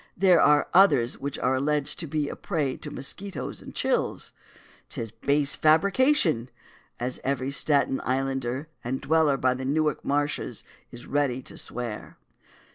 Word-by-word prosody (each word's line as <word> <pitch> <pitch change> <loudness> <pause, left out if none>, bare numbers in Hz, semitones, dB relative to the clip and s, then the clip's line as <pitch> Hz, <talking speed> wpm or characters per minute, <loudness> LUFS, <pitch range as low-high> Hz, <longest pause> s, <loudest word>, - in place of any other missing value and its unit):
There 185 -2 +5
are 150 0 +4
others 145 -11 +4
which 140 0 -4
are 125 +1 +1
alleged 150 +3 -1
to 170 - -4
be 150 0 -1
a - - -5
prey 150 -8 -2
to 150 - -8
mosquitoes 190 +8 -5
and - - -11
chills. - - -1 0.6
'Tis 115 -2 -4
a - - -24
base 145 0 +3
fabrication, 165 - +3 0.5
as 125 +1 -2
every 135 0 -1
Staten 140 -2 +2
Islander 135 +1 -2 0.2
and 130 +2 -2
dweller 155 -2 +2
by 130 -1 +2
the 130 +1 -6
Newark 150 +2 0
marshes 145 0 -1 0.3
is 120 0 -9
ready 135 -3 0
to - - -8
swear. 120 -3 -5
140 Hz, 150 wpm, -26 LUFS, 130-155 Hz, 0.6 s, There